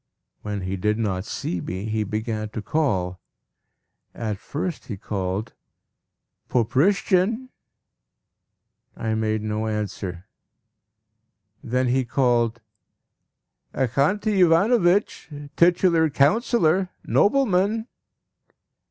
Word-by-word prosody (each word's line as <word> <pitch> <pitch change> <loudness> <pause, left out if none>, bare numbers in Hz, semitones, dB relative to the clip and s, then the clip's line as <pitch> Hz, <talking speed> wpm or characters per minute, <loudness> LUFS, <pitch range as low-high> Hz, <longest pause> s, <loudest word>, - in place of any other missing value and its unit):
When 105 -1 -4
he 95 +1 -3
did 105 +3 0
not 100 -4 -2
see 90 -4 -4
me, 95 +3 -5
he 110 0 -1
began 110 +1 -3
to 110 - -4
call. 95 - -1 1.0
At 110 -4 -3
first 160 - -5
he 105 - -5
called 95 +2 -3 1.0
"Poprishchin!" 190 - +2 1.5
I 110 -1 -2
made 110 -1 -1
no 110 +1 -2
answer. 100 -4 -4 1.4
Then 125 +1 0
he 130 +1 +2
called 120 -2 +1 1.1
"Axanti 185 - +1
Ivanovitch! 180 +2 +3 0.3
Titular 170 -2 +4
Councillor! 180 - +2 0.2
Nobleman!" 215 -2 +2
120 Hz, 85 wpm, -23 LUFS, 105-180 Hz, 1.5 s, Titular